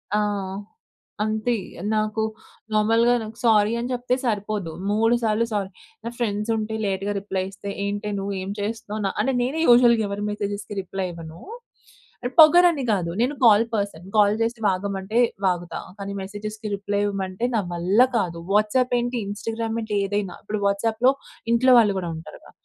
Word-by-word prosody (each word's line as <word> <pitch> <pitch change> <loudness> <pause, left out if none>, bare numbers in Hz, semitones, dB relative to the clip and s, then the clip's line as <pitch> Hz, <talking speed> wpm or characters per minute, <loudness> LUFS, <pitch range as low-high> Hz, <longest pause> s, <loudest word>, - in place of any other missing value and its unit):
ఆ! - - +3 1.0
అంతే. 220 +3 0 0.4
నాకు 215 0 0 0.5
నార్మల్‌గా 225 +3 +4
నాకు 220 +1 -9
సారీ 215 -2 +4
అని 240 +1 -3
చెప్తే 250 +1 0
సరిపోదు. 205 -5 -2 0.2
మూడు 225 +3 +3
సార్లు 220 +1 +2
సారీ 200 -2 -1 0.4
నా 235 - -2
ఫ్రెండ్స్ 210 -2 -2
ఉంటే, 215 0 -3
లేట్‌గా 195 +1 -1
రిప్లై 195 -1 -3
ఇస్తే, 200 +1 -8 0.2
ఏంటే 205 +1 -3
నువ్వు 200 +1 -3
ఏం 190 - -5
చేస్తున్నావు? 215 0 -4
న - - +3
అంటే 270 - 0
నేనే 270 +6 -1
యూజువల్‌గా 240 -2 +6
ఎవరి 200 +1 -4
మెసేజెస్‌కి 205 0 -4
రిప్లై 190 +1 -4
ఇవ్వను. 165 -1 -10 0.8
అని 245 +1 -3
పొగరని 335 -1 +7
కాదు. 180 -5 0
నేను 255 +4 +1
కాల్ 220 0 +6
పర్సన్. 200 -5 -3
కాల్ 205 0 +5
చేసి 230 +1 -1
వాగమంటే, 195 +2 -2 0.3
వాగుతా. 175 -2 -1 0.2
కానీ, 200 0 -5
మెసేజెస్‌కి 210 +2 -6
రిప్లై 200 0 -2
ఇవ్వమంటే 195 +2 -2
నా 220 - +2
వల్ల 180 +6 +1 0.2
కాదు. 175 -6 -1 0.2
వాట్సాప్ 215 +5 +2
ఏంటి, 245 +1 -2
ఇన్‌స్టాగ్రామ్ 225 +2 -3
ఏంటి, 215 -1 -3
ఏదైనా. 200 -2 -2
ఇప్పుడు 210 0 -3
వాట్సాప్‌లో 225 +5 +2 0.4
ఇంట్లో 255 +2 +5
వాళ్ళు 210 -3 +3
కూడా 175 -2 -4
ఉంటారుగా, 160 - -12
210 Hz, 155 wpm, -23 LUFS, 200-230 Hz, 1.0 s, పొగరని